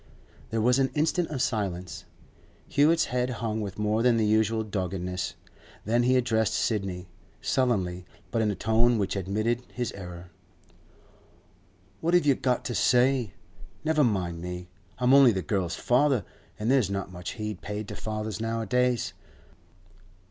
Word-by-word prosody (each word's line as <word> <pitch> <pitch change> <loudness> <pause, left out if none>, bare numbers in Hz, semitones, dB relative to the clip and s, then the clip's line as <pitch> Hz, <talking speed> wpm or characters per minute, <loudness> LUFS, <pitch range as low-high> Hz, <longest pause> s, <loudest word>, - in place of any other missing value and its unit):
There 110 0 -1
was 125 +4 +3
an 135 -1 +2
instant 160 +3 +1
of 135 -4 -1
silence. 95 - -3 0.6
Hewett's 155 +3 +3
head 125 0 +1
hung 115 -3 -2
with 100 -3 -5
more 105 +1 +1
than 120 -1 +4
the 110 - +2
usual 110 +1 +2
doggedness. 90 -3 -3 0.5
Then 115 +3 +2
he 125 +1 +3
addressed 110 -3 +1
Sidney, 95 -5 -1 0.3
sullenly, 95 -8 0 0.2
but 115 0 +1
in 110 - +2
a 105 - -1
tone 115 +4 +2
which 100 -2 -1
admitted 110 +5 -1
his 120 -2 -3
error. 90 -2 -9 1.7
'What 170 +2 +1
have 175 - +4
you 140 - +5
got 125 -1 -1
to 120 - -2
say? 125 -3 +3 0.5
Never 155 -1 +3
mind 90 -8 0
me. 90 0 -6 0.3
I'm 125 +1 +3
only 135 -3 +8
the 95 -2 -2
girl's 90 +1 -1
father, 125 -3 +2 0.3
an' 110 +2 -2
there's 130 -7 +3
not 100 -1 -3
much 90 0 -6
heed 105 -3 -5
paid 105 0 -5
to - - -6
fathers 110 -1 -4
nowadays. 115 +2 0
110 Hz, 150 wpm, -27 LUFS, 95-125 Hz, 1.7 s, only